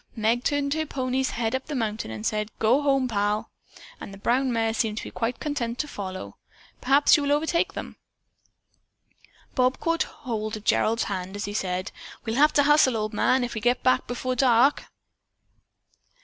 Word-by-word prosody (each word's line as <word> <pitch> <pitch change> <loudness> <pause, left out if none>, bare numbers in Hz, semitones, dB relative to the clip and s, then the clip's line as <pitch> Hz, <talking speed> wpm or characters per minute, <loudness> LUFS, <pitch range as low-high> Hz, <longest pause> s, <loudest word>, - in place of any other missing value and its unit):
"Meg 230 +2 +1
turned 285 0 0
her 315 0 0
pony's 260 -3 -1
head 230 -1 -2
up 260 0 -3
the 300 - -4
mountain 220 - -2
road 110 - -5
and 110 0 -7
said, 210 0 -1
'Go 235 +6 +3
home, 275 -2 +2
Pal,' 210 -1 -1 0.5
and - - -8
the 195 - -10
brown 250 +6 +1
mare 225 -1 0
seemed 220 -1 -1
to - - -4
be - - -8
quite 235 +1 -3
content 245 -6 -3
to 300 - -2
follow. 190 -7 -7 0.4
Perhaps 275 +3 +5
you 300 - +1
will 285 0 0
overtake 330 +6 +1
them." - - -7 1.6
Bob 255 +1 +1
caught 330 0 0
hold 220 -4 -4
of 210 - -12
Gerald's 225 +1 +2
hand 190 0 -4
as 205 - -3
he 205 - -5
said: 185 -2 -2 0.3
"We'll 225 - -2
have 300 +2 +5
to 285 - +4
hustle, 285 -4 +4
old 215 0 -3
man, 255 +4 +2
if 245 - -3
we 220 - -4
get 245 +2 +1
back 255 0 +2
before 255 +1 -2
dark." 255 +2 +3
240 Hz, 190 wpm, -25 LUFS, 215-275 Hz, 1.6 s, Perhaps